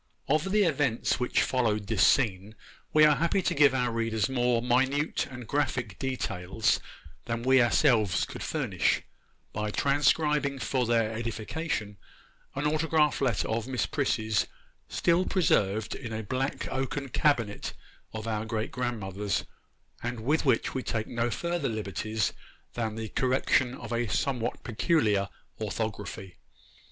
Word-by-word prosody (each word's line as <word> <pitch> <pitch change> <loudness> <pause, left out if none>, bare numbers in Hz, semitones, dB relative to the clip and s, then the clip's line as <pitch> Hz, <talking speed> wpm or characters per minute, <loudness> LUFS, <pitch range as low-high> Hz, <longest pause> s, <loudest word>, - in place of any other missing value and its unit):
OF 155 +6 +1
the 210 0 +4
events 140 - +1
which 125 - +2
followed 110 -5 0
this 110 +2 0
scene, 105 -4 +2 0.4
we 155 0 +7
are 150 -2 +5
happy 170 +3 +1
to - - +1
give 140 -2 +5
our 125 -2 +1
readers 115 -2 0
more 125 -2 +1
minute 130 +5 +1
and 125 -2 -8
graphic 125 -8 -1
details 110 -5 0 0.5
than 115 0 -3
we 130 0 +5
ourselves 115 -6 +3
could - - -9
furnish, - - 0 0.5
by 105 0 -2
transcribing 145 +2 +2
for 125 0 -1
their 115 -2 +2
edification 110 0 -3 0.6
an 135 +2 -2
autograph 155 -1 +2
letter 125 -7 +1
of 110 +1 -2
Miss 125 -6 0
Prissy's, 110 -4 0 0.4
still 170 +2 +2
preserved 110 - +1
in 115 -4 -6
a 110 0 -3
black 130 +6 -2
oaken 135 +2 -2
cabinet 120 -7 0 0.4
of 110 0 -6
our 110 -1 -1
great 110 0 -3
grandmother's, 105 -5 -2 0.6
and 120 -1 -4
with 150 +7 +1
which 125 -4 +2
we 130 - -2
take 110 -3 -2
no 120 0 -1
further 170 +6 -1
liberties 110 0 -2 0.4
than 110 -2 -2
the 110 -1 -5
correction 130 0 +1
of - - -7
a 120 0 0
somewhat 120 +3 -1
peculiar 105 - +1 0.3
orthography. 105 -3 -4
120 Hz, 140 wpm, -28 LUFS, 110-140 Hz, 0.6 s, we